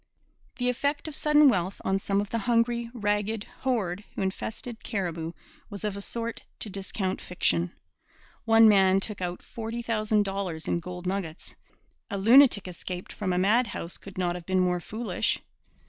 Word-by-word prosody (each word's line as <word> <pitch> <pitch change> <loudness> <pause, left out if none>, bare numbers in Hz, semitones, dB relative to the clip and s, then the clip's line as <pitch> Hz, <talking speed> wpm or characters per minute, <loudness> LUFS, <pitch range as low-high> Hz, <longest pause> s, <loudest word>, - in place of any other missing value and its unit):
The 245 -1 0
effect 285 +5 0
of 305 - -6
sudden 300 -1 +5
wealth 190 -5 +1
on 195 0 +2
some 195 0 0
of 205 - -6
the 230 - 0
hungry, 235 +1 +1
ragged 210 -1 -1 0.2
horde 210 -7 -1
who - - -1
infested 220 +4 -4
Cariboo 170 -5 -3 0.4
was 200 -2 -7
of 210 -2 -1
a 200 - -5
sort 230 +2 -3 0.2
to 210 - -1
discount 190 0 -3
fiction. 85 - 0 0.7
One 225 0 +7
man 195 -2 +5
took 205 -1 -5
out 175 0 -3
forty 230 +1 -5
thousand 215 -2 +2
dollars 195 -5 -3
in - - +1
gold 180 +1 -7
nuggets. 180 -3 -4 0.6
A 200 - -2
lunatic 230 0 +6
escaped 180 0 -6
from 195 -3 -2
a 180 - +1
madhouse 205 -2 +1
could 195 -1 -11
not 175 -1 +1
have 175 -1 -8
been 185 -1 +2
more 180 -1 +2
foolish. 220 +6 -1
200 Hz, 165 wpm, -27 LUFS, 185-230 Hz, 0.7 s, One